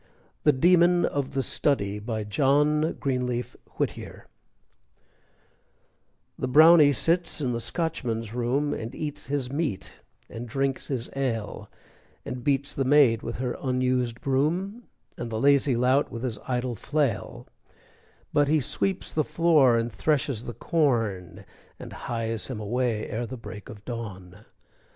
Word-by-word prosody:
THE 150 - +7
DEMON 175 +4 +4
OF 140 -2 -2
THE 135 - +1
STUDY 105 -8 0
BY 110 0 -3
JOHN 150 +7 +2
GREENLEAF 125 -3 -2 0.2
WHITTIER - - -4 2.1
The - - -1
Brownie 155 +2 +7
sits 170 +6 +1
in 130 -4 -1
the 115 - -2
Scotchman's 115 -7 -3
room, 125 +5 0
And 115 +1 -6
eats 150 -2 -5
his 135 -2 -2
meat 145 - -3 0.3
and 115 +1 -8
drinks 135 +2 -1
his 130 -4 -3
ale, 115 -6 -3 0.6
And 125 -1 -5
beats 140 0 0
the 135 - 0
maid 130 -5 +5
with 115 - -5
her 125 -1 -2
unused 125 -2 0
broom, 170 - -1 0.3
And 120 - -4
the 110 -1 -3
lazy 140 -1 +4
lout 130 +4 +2
with 115 +1 -6
his 120 -4 -3
idle 125 -1 -1
flail; 140 0 -2 0.9
But 145 -1 +3
he 155 +2 +3
sweeps 185 +7 -1
the 155 - +1
floor 150 -6 +4
and 115 +1 -1
threshes 125 +2 0
the 120 - -6
corn, 115 - -1 0.3
And - - -9
hies 115 -2 -3
him 130 -5 -5
away 115 +1 -1
ere 115 +2 -3
the 130 - -7
break 105 -3 -10
of 105 -1 -11
dawn. 105 -5 -7
130 Hz, 140 wpm, -26 LUFS, 115-145 Hz, 2.1 s, THE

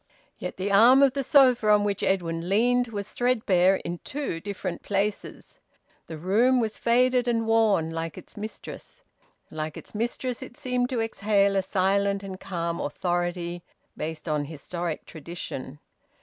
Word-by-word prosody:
Yet - - -5
the 195 +2 -2
arm 240 +7 +7
of 270 -2 +4
the 275 - -1
sofa 255 -6 +5
on 210 -1 +5
which 200 -1 -1
Edwin 170 -2 -1
leaned 245 +4 +3
was 205 -3 -6
threadbare 200 -7 +3
in 170 0 -4
two 280 - -4
different 185 -1 -5
places. 205 +1 -3 0.5
The 160 - -7
room 225 +10 +3
was 220 -2 -1
faded 250 +1 +2
and 230 -1 +1
worn, 215 -8 +3
like 165 -1 -4
its - - -12
mistress. 220 - -9 0.5
Like 155 0 -5
its - - -11
mistress 240 +3 -3
it 245 - -10
seemed 250 -1 -1
to 250 -4 -1
exhale 200 -3 +1
a 195 - +3
silent 200 +1 +1
and 190 -1 -7
calm 170 -2 -3
authority, 175 +2 -2 0.3
based 160 +1 -5
on 150 -2 0
historic 165 +2 -5
tradition. 155 -4 -7
200 Hz, 150 wpm, -26 LUFS, 175-235 Hz, 0.5 s, arm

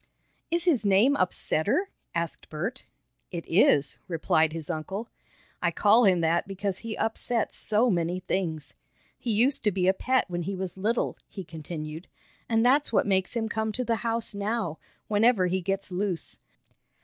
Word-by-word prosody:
"Is 340 0 0
his 305 - +2
name 205 +8 +4
Upsetter?" 220 - +1 0.3
asked 170 0 -3
Bert. 185 +12 -4 0.4
"It 170 -2 -5
is," 145 -5 +3
replied 160 -2 +2
his 160 -1 -6
uncle. 190 +9 -4 0.5
"I - - +2
call 220 +3 +4
him 185 -3 +4
that 165 +2 +1
because 195 -1 -3
he 225 -1 -5
upsets 225 0 -1
so 220 +3 +1
many 175 0 0
things. 170 -5 -3 0.5
He 245 - -4
used 240 +6 +2
to 210 - +4
be 185 -1 0
a 190 - +5
pet 260 +6 +1
when 175 -1 -3
he 195 +4 -3
was 185 -2 -4
little," 215 +5 -1
he 195 - -7
continued, 160 0 -7 0.4
"and 225 0 +3
that's 280 +3 +4
what 225 - +3
makes 190 +2 +1
him 225 -1 0
come 220 -1 -1
to 250 - -2
the 230 -1 +1
house 230 -1 -1
now, 205 -5 -2 0.3
whenever 215 -2 +3
he 185 +1 0
gets 195 +2 -2
loose. 180 -1 -2
195 Hz, 165 wpm, -27 LUFS, 175-230 Hz, 0.5 s, a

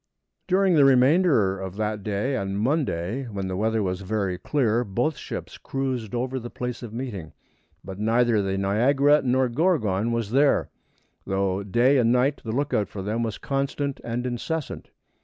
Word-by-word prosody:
During 190 0 +3
the 150 -3 +5
remainder 130 - +4
of 95 -1 -6
that 105 0 -2
day 105 +7 -1
and 100 -3 -2
Monday, 125 - -1
when 100 -4 -4
the 95 - -3
weather 110 +2 0
was 95 0 -2
very 95 -2 -2
clear, 120 -5 +1
both 120 +9 -1
ships - - -7
cruised 130 -5 -3
over 130 +2 -2
the 120 0 -7
place 125 0 -5
of 120 -3 -7
meeting, 110 -9 -6 0.5
but 95 0 -8
neither 115 0 +2
the 95 0 -1
Niagara 135 +9 +3
nor 130 0 +2
Gorgon 120 - +1
was 115 -3 -2
there, 140 +3 +3 0.6
though 95 0 0
day 120 +7 +3
and 115 -1 +3
night 130 +4 +2
the 110 - -4
lookout 120 -6 0
for 95 - -6
them 110 +4 -2
was 115 -2 -2
constant 140 0 -2
and 120 +1 -3
incessant. 130 +5 -4
120 Hz, 165 wpm, -25 LUFS, 100-135 Hz, 0.6 s, the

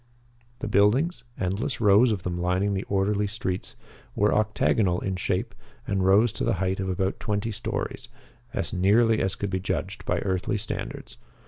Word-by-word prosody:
The - - -2
buildings 125 - +2
endless 100 +9 -2
rows 110 +3 +5
of 100 -4 -2
them 90 -1 -2
lining 90 +3 +1
the 95 - -1
orderly 100 +1 +1
streets 100 -3 -4 0.4
were 105 +1 +3
octagonal 110 -3 +2
in 95 -1 -2
shape 90 - -2 0.3
and 95 -2 0
rose 100 +4 +4
to - - -3
the - - +1
height 95 +1 -1
of 95 -1 -2
about 95 +1 -1
twenty 105 +1 -2
stories, 105 - -4 0.4
as 115 - -3
nearly 110 +5 +3
as 95 0 0
could 100 -1 -4
be 95 - 0
judged 95 +2 -3
by - - +1
earthly 95 +1 -1
standards. 100 - -5
100 Hz, 165 wpm, -26 LUFS, 95-110 Hz, 0.4 s, rows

